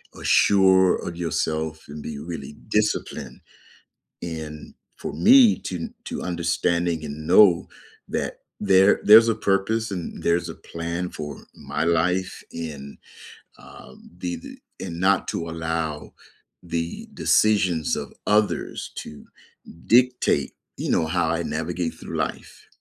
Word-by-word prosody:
uh, - - -11
sure 95 -2 +5
of 85 - -6
yourself 80 -2 -2
and 75 +1 -8
be 75 -1 -6
really 80 -1 -7
disciplined, 105 0 -1 0.8
and 80 -3 -7 0.2
for - - -6
me 240 -1 +6
to 95 - -5
n 85 - -6
to - - -5
understanding 85 -1 0
and 75 +1 -7
know 90 -3 +6 0.4
that - - -3 0.2
there 95 +1 +4
there's 110 +2 +9
a 115 - +3
purpose 110 +2 0
and 90 -4 -6
there's 85 +1 +1
a - - -6
plan 85 +2 -5
for 75 -2 -7 0.3
my 75 - -2
life 90 +3 0
and, 75 -4 -7 0.6
um, 65 - -14
be 90 -1 -3
the 85 - -11 0.3
and 85 0 -6
not 95 +1 +3
to 85 0 -3
allow 80 -2 -3 0.5
the 85 -1 -4
decisions 95 -8 +2
of - - -6 0.2
others 105 0 0
to 75 - -9 0.6
dictate, 125 +1 +3 0.3
you - - -2
know, 80 - +2
how 85 0 0
I 85 +1 0
navigate 80 +2 -3
through - - -8
life. - - -5
85 Hz, 130 wpm, -24 LUFS, 80-95 Hz, 0.8 s, there's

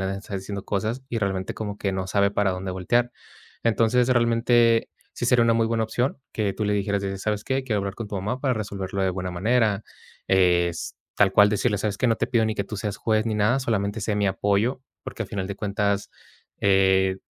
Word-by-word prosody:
le 95 - -1
debe 95 +1 -3
está 100 0 -8
diciendo 100 +1 -5
cosas 110 +6 -2
y 115 - -2
realmente 95 -2 -2
como 105 -2 -5
que 100 -2 -1
no 95 -1 -3
sabe 100 0 +2
para 100 -2 +1
dónde 95 0 -4
voltear. 120 +7 0 0.5
Entonces, 115 +2 +2
realmente 115 -1 +3 0.2
sí - - -4
sería 120 -1 +4
una 115 -1 +3
muy 115 -1 +2
buena 115 -1 0
opción 125 +5 -1
que 105 -3 -1
tú 105 +2 -3
le 105 - +1
dijeras 100 0 0
de 100 0 -3
de: 95 - -5
"¿Sabes 105 +1 -2
qué?, 135 0 -1
quiero 110 -5 -1
hablar 100 0 -3
con 115 -3 -6
tu 105 - -4
mamá 105 +7 -3
para 130 -3 +1
resolverlo 100 -2 -3
de 95 - +2
buena 90 0 -4
manera", 105 +2 +1 0.5
es 90 -2 +2 0.2
tal 95 -2 +4
cual 105 +1 +6
decirle: 105 0 0
"¿Sabes 105 0 -2
qué?, 125 - +1
no 115 -1 +2
te - - -1
pido 115 -2 +2
ni 110 -1 -1
que 100 - -1
tú 105 - -6
seas 100 0 -3
juez 110 -1 +1
ni 110 -2 -1
nada, 105 +6 +2
solamente 110 -3 -1
sé 105 +1 -1
mi 100 - +1
apoyo", 100 +6 0 0.2
porque - - -5
al - - -8
final 95 -2 -3
de 100 - -4
cuentas, 100 -1 -1 0.5
eh, 95 -1 +3
105 Hz, 230 wpm, -24 LUFS, 95-115 Hz, 0.5 s, cual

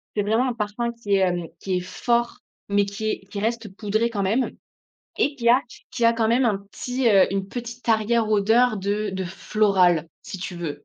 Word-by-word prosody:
c'est 210 - +1
vraiment 225 +5 +1
un - - -2
parfum 230 +2 -2
qui 230 -4 -4
est, 195 - +3
hem, 175 -2 0
qui 185 -2 -1
est - - 0
fort 235 +6 -1 0.3
mais 200 0 +3
qui 210 +2 -3
est - - -2
qui 200 - -4
reste 225 -2 -3
poudré 215 +3 0
quand 205 -3 -2
même 225 +7 +1 0.7
et 285 - +2
qui 235 -3 0
a 250 +3 +6
q - - -14
qui 235 - -2
a 230 - +6
quand 225 -1 0
même 245 +3 +3
un 215 -4 +2
petit, 245 +5 -2
heu, 195 -3 +6
une 195 0 -2
petite 240 +1 -7
arrière 220 0 +2
odeur 220 +3 +3
de 205 +1 -2
de 190 0 -3
floral, 180 -3 +2
si 190 - -7
tu 185 0 -5
veux. 165 -4 -6
215 Hz, 215 wpm, -23 LUFS, 195-235 Hz, 0.7 s, a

